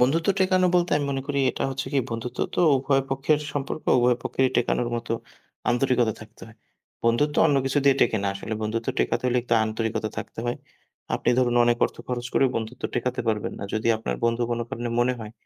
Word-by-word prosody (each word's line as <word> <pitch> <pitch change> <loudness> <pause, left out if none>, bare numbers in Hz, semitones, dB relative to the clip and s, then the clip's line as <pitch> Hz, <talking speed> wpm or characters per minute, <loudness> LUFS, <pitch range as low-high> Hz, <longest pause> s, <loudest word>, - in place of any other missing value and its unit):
বন্ধুত্ব 150 +8 +2
টেকানো 185 -1 +3
বলতে 175 0 +1
আমি 145 -1 -1
মনে 135 -1 -2
করি, 140 -1 0
এটা - - -4
হচ্ছে 135 +1 -4
কি 140 - +3
বন্ধুত্ব 115 +2 -5 0.2
তো - - +1 0.2
উভয় 135 +1 +2
পক্ষের 135 +3 +1
সম্পর্ক, 145 +1 -3 0.2
উভয় 120 0 +3
পক্ষেরই 130 -1 +1
টেকানোর 120 0 +1
মতো 120 0 -4 0.6
আন্তরিকতা 120 -2 +2
থাকতে 110 +1 -14
হয়। 110 0 -16 0.5
বন্ধুত্ব 130 +6 +2
অন্য 145 - +3
কিছু 135 +2 +1
দিয়ে 140 -1 +6
টেকে 110 - +3
না। - - +1
আসলে 100 +3 -5
বন্ধুত্ব 115 +2 -2
টেকাতে - - 0
হলে 125 0 +2 0.3
আন্তরিকতা 110 0 -2
থাকতে - - -6
হয়। 120 - -1 0.6
আপনি - - +1
ধরুন 125 -2 +2
অনেক 120 0 +2
অর্থ - - -4
খরচ 120 -1 -2
করেও 135 - +4
বন্ধুত্ব 115 +3 -5
টেকাতে 125 +1 -1
পারবেন 105 -2 -1
না। - - -5
যদি 110 +1 0
আপনার 110 - -3
বন্ধু 115 +1 +1
কোনো 120 0 -1
কারণে 120 +1 -4
মনে 125 +1 +3
হয় 110 -1 -8
120 Hz, 200 wpm, -25 LUFS, 115-135 Hz, 0.6 s, দিয়ে